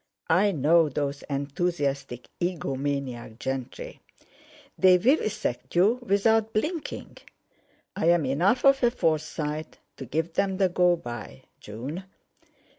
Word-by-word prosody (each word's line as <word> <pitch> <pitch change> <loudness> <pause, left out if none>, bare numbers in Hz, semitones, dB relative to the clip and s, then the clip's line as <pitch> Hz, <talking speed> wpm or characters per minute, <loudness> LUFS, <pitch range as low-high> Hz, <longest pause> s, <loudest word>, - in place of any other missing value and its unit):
I 195 +5 +4
know 160 0 +3
those 140 0 -3
enthusiastic 140 -3 -2
egomaniac 140 -8 -3
gentry. 130 0 -5 0.7
They 185 -1 +6
vivisect 215 - 0
you 205 +8 +4
without 220 0 +2
blinking. 310 +9 -3 0.8
I'm 170 -2 +3
enough 175 - +2
of 275 0 +5
a 240 - +5
Forsyte 155 -6 -2 0.2
to 135 - -7
give 160 +6 -2
them 195 0 0
the 190 -1 +3
go 180 0 +3
by, 120 - -8 0.2
June." 135 - -7
165 Hz, 110 wpm, -26 LUFS, 140-195 Hz, 0.8 s, They